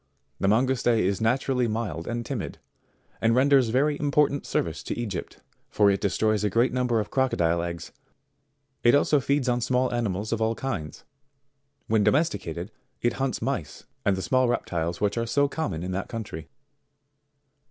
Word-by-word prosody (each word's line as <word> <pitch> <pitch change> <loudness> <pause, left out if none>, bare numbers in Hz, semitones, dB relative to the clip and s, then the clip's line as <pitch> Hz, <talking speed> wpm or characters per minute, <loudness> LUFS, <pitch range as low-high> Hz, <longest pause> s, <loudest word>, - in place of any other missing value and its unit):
The 95 - +1
Mangouste 125 +5 +2
is 100 0 0
naturally 125 +2 +1
mild 105 -8 -3
and 120 0 -3
timid, - - -4 0.6
and 115 +1 +3
renders 135 -2 +4
very 145 +5 +1
important 145 -1 +1
service - - -1
to - - -5
Egypt, 105 -6 -5 0.3
for 105 -1 +4
it 100 - -1
destroys 105 +1 +1
a 105 - +2
great 115 +6 +2
number 125 -2 +1
of 105 - -4
crocodile 85 -11 +1
eggs; 85 -1 -5 0.9
it 120 +3 +6
also 145 0 +3
feeds 140 0 0
on 120 0 +1
small 125 +1 +1
animals 110 -2 -1
of 115 - -2
all 110 +1 +1
kinds. 100 - -5 0.8
When 110 -1 +2
domesticated 100 - 0 0.3
it 120 - +2
hunts 135 -4 -1
mice 120 - -3 0.2
and 100 - +2
the 95 - -3
small 130 +6 +2
reptiles 85 -8 -2
which 105 +2 +1
are 115 - -2
so 140 +5 +2
common 140 - -3
in 90 - -3
that 95 +2 -3
country. 100 -9 -6
115 Hz, 165 wpm, -26 LUFS, 100-130 Hz, 0.9 s, it